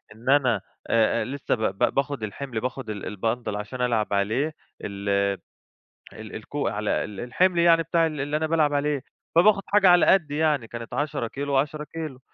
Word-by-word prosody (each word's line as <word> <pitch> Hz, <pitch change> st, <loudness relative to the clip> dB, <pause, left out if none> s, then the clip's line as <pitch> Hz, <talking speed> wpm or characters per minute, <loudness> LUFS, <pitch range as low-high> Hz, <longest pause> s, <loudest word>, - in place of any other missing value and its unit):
إن 120 Hz, +4 st, -6 dB
أنا 135 Hz, -4 st, +3 dB, 0.3 s
آآ 115 Hz, 0 st, +2 dB
لسّه 140 Hz, 0 st, -2 dB
ب 110 Hz, -, -9 dB, 0.2 s
ب 120 Hz, -, +2 dB
باخُد 140 Hz, -4 st, -1 dB
الحِمل، 115 Hz, +2 st, -4 dB
باخُد 125 Hz, -2 st, -4 dB
ال 105 Hz, 0 st, -5 dB
الBundle 110 Hz, 0 st, -2 dB
عشان 120 Hz, +5 st, -5 dB
ألعب 115 Hz, -4 st, 0 dB
عليه 115 Hz, +10 st, 0 dB, 0.3 s
ال 100 Hz, 0 st, -5 dB, 1.0 s
ال -, -, -9 dB
الكو -, -, -3 dB
على -, -, -1 dB
ال 105 Hz, -2 st, -8 dB
الحِمل 175 Hz, +8 st, +1 dB
يعني 165 Hz, -1 st, +5 dB
بتاع 165 Hz, +1 st, +2 dB
ال 155 Hz, -3 st, -3 dB
اللي 145 Hz, +2 st, -1 dB
أنا 160 Hz, 0 st, -1 dB
بالعب 155 Hz, -2 st, +2 dB
عليه، 145 Hz, -2 st, 0 dB, 0.3 s
فباخُد 195 Hz, +3 st, +5 dB
حاجة 200 Hz, -2 st, +5 dB
على 175 Hz, -1 st, +6 dB
قَدّي 150 Hz, -6 st, +3 dB
يعني، 150 Hz, -7 st, +1 dB
كانت 115 Hz, 0 st, -8 dB
10 145 Hz, -5 st, -2 dB
كيلو 140 Hz, +3 st, -4 dB
و10 150 Hz, +2 st, 0 dB
كيلو. 155 Hz, -5 st, -7 dB
140 Hz, 180 wpm, -25 LUFS, 115-155 Hz, 1.0 s, على